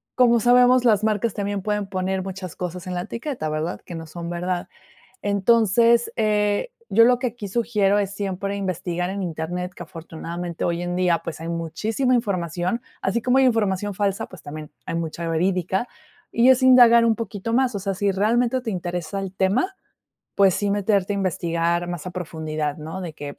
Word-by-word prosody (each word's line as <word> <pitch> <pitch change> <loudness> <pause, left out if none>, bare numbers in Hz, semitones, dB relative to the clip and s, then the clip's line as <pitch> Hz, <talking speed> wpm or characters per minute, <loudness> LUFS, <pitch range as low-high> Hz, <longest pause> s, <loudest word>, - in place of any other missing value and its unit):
como 240 -2 +5
sabemos, 245 +2 +5
las 215 -2 +4
marcas 215 0 0
también 200 -1 -2
pueden 210 0 -1
poner 190 0 -2
muchas 190 -2 -7
cosas 180 0 -5
en 180 - -3
la 175 - -1
etiqueta, 235 - -4
¿verdad?, 155 +3 -3
que 175 - -8
no 165 -1 -7
son 170 +2 -6
verdad, 175 +1 -2 0.6
entonces, 230 +3 +3
eh, 210 - +1 0.2
yo 230 - +6
lo 245 0 +4
que 255 - -1
aquí 230 -4 -5
sugiero 205 -2 +1
es 200 -1 -1
siempre 200 0 -3
investigar 180 -2 -2
en 195 0 -3
internet 175 +2 -4
que - - -8
afortunadamente 170 +1 -6
hoy 170 0 0
en 175 0 -3
día 180 -2 +2
pues 165 -2 -7
hay 165 - -5
muchísima 215 - -1
información, 185 -1 -1 0.2
así 200 +5 0
como 250 +3 +2
hay 265 - +5
información 205 -4 +1
falsa, 200 0 -1
pues, - - -13
también 150 +1 -8 0.2
hay - - -3
mucha 165 0 -3
verídica 185 +5 0 0.5
y 235 +2 +4
es 260 0 +5
indagar 240 -2 +7
un 230 - +4
poquito 220 0 -5
más, 255 -1 +2
o - - -1
sea, 195 0 -2
si 200 +1 +1
realmente 235 +6 +1
te 225 - -3
interesa 175 0 -3
el 195 -1 -6
tema, 225 - +1 0.6
pues 195 -2 +4
sí 205 -1 0
meterte 200 -1 +1
a - - -2
investigar 170 -2 0
más 175 -1 -5
a 180 - -5
profundidad, 155 -4 -3
¿no?, 160 +5 -6
de 170 -3 -5
que, 145 -1 -8
195 Hz, 185 wpm, -23 LUFS, 175-225 Hz, 0.6 s, indagar